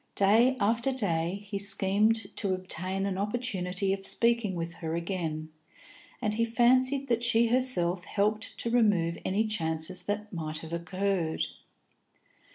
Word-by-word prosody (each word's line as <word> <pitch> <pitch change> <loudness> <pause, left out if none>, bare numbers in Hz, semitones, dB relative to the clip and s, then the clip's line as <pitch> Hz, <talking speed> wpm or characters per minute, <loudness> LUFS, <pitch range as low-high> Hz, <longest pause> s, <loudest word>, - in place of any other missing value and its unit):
Day 225 +6 +4
after 230 +5 +1
day, 190 -5 -1
he 200 -1 -4
schemed 200 +3 +1
to 195 -3 0
obtain 185 +1 -4
an 195 -1 -2
opportunity 195 -3 -1
of 195 0 -5
speaking 230 -1 +2
with 170 0 -4
her 160 -1 -2
again, 170 -3 -3 0.7
and 210 - +1
he 230 +2 +1
fancied 255 +4 +3
that 235 -2 +1
she 235 -1 +3
herself 195 -8 +2
helped 215 +4 -1
to 235 - +1
remove 200 -8 +2
any 205 +4 +1
chances 165 -3 -1
that 205 +2 -4
might 155 -2 -4
have 160 +1 -8
occurred. 180 -1 -1
200 Hz, 140 wpm, -29 LUFS, 175-225 Hz, 0.7 s, Day